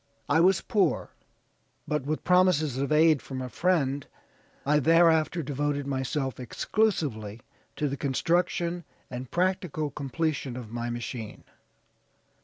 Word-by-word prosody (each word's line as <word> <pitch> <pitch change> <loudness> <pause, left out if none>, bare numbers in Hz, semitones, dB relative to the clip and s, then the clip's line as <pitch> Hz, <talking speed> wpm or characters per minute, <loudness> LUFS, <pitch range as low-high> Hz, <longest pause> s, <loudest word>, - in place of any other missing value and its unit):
I 150 +3 +3
was 185 +3 +4
poor, 210 -6 0 0.8
but 150 -2 -2
with 155 +1 -2
promises 180 -6 +3
of 140 +2 -1
aid 155 -1 +5
from 130 -1 -6
a 130 -1 -4
friend, 145 -5 0 0.6
I 150 +1 +4
thereafter 165 +2 +4
devoted 145 0 -2
myself 135 0 -2
exclusively 125 - -1 0.3
to 150 - 0
the 140 0 -3
construction 170 +5 0 0.3
and 125 0 -6
practical 175 -5 -1
completion 140 -2 -2
of 115 -4 -8
my 120 0 -3
machine. 120 -2 -6
145 Hz, 120 wpm, -27 LUFS, 130-170 Hz, 0.8 s, aid